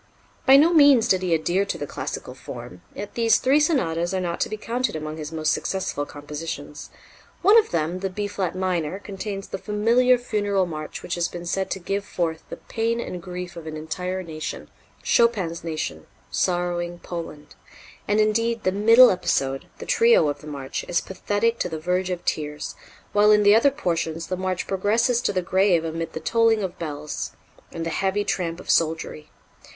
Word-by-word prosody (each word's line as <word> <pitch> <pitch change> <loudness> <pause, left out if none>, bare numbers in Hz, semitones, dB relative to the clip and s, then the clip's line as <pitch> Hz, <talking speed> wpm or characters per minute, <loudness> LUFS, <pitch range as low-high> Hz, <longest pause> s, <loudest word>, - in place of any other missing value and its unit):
By 270 +1 +9
no 320 +5 +5
means 285 -7 +6
did 185 -4 +3
he 180 -2 -1
adhere 175 +5 +1
to - - -3
the 145 - -4
classical - - -5
form; 90 0 -9
yet 205 - -6
these 230 -1 +4
three 275 +3 +3
sonatas 180 - +1
are - - 0
not 175 -2 -3
to - - 0
be 215 - -4
counted 235 -1 -2
among 155 0 -5
his 155 0 -6
most 155 -1 0
successful 165 -6 -2
compositions. 145 0 -7 0.5
One 405 +4 +7
of 440 - -1
them, 170 +2 -1
the 195 +1 -2
B 205 +3 -3
flat 190 -3 -3
minor, 185 -2 -1
contains 195 0 -6
the 195 - -4
familiar 230 +5 +3
funeral 205 -5 0
march 155 -3 -6
which 175 - -4
has 170 -1 0
been 175 0 -8
said 190 +2 -1
to 195 - -3
"give 195 +3 -2
forth 165 -5 -2
the - - -6
pain 230 +1 -2
and 180 -6 -5
grief 180 0 -7
of 165 -2 -9
an 155 0 -5
entire 180 +4 -4
nation" 155 -3 -6 0.3
Chopin's 195 -9 +2
nation, 155 - -4 0.2
sorrowing 175 -1 -1
Poland; 165 -4 -8 0.5
and, 205 +1 +2
indeed, 230 +2 +1
the 185 - +2
middle 225 +6 +7
episode, 135 -7 -1
the - - -8
trio 230 -10 +4
of 145 - -4
the 155 - -11
march, 140 -3 -5
is 175 - +1
pathetic 205 +4 -1
to - - -1
the 160 - -4
verge 180 +3 -1
of 180 -1 -4
tears, 150 -1 -3 0.4
while 205 0 +5
in 210 0 +6
the 205 0 +7
other 230 +6 +6
portions 165 - -2
the 185 - 0
march 185 0 -2
progresses 225 +5 +1
to - - 0
the 185 -2 -1
grave 185 -2 +2
amid 165 0 -4
the - - -4
tolling 225 +4 +2
of 185 -2 -5
bells 150 -2 -5 0.4
and 165 0 -5
the 165 - -2
heavy 195 +4 0
tramp 170 -4 -2
of - - -12
soldiery. 160 -1 0
185 Hz, 190 wpm, -24 LUFS, 165-210 Hz, 0.5 s, By